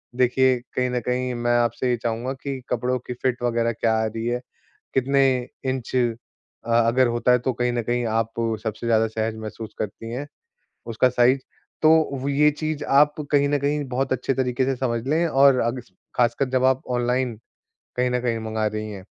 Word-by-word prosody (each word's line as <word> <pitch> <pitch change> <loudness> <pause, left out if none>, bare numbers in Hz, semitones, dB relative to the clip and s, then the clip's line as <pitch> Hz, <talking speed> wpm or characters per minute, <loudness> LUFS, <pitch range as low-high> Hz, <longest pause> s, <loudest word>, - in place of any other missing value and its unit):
देखिए, 130 +1 +3 0.2
कहीं 125 0 +1
न 125 - 0
कहीं 125 0 0
मैं 120 0 +1
आपसे 120 +2 0
ये 120 - +1
चाहूँगा 120 +3 -2
कि 135 -2 -3
कपड़ों 125 +1 0
की - - -3
फ़िट 125 0 -2
वगैरह 115 -1 +1
क्या 115 0 +1
आ - - +1
रही 115 +1 -4
है, 120 +1 -1 0.5
कितने 135 +1 +3 0.5
इंच 130 -2 -4 0.7
अ 115 0 +3
अगर 130 +2 +4
होता 120 +1 +2
है 125 - +5
तो 130 +2 -1
कहीं 125 0 0
न 120 - 0
कहीं 120 +2 -1
आप 115 0 0 0.3
सबसे 110 +1 -4
ज़्यादा 115 -1 +3
सहज 110 0 -2
महसूस 110 0 -7
करती 110 +2 -5
हैं, 140 +4 -4 0.6
उसका 115 +3 +2
साइज़। 125 +2 +3 0.4
तो 155 - +7 0.3
व 145 +2 +3
चीज़ 155 -2 -2 0.2
आप 150 0 +4 0.2
कहीं 145 -1 +3
न 145 - +2
कहीं 145 +1 0
बहुत 130 +1 -1
अच्छे 130 +1 -1
तरीके 130 0 0
से 135 0 0
समझ 120 -3 -1
लें, 160 +4 +2
और 135 -3 +5
अग्स 120 -2 -3 0.3
ख़ासकर 125 +2 +2
जब 130 0 +2
आप 130 0 +3 0.2
ऑनलाइन 125 -1 0 0.6
कहीं 125 0 +2
न 125 - +1
कहीं 115 -2 -1
मँगा 110 -1 -1
रही 110 0 -4
हैं। 95 -2 -9
125 Hz, 190 wpm, -23 LUFS, 115-130 Hz, 0.7 s, तो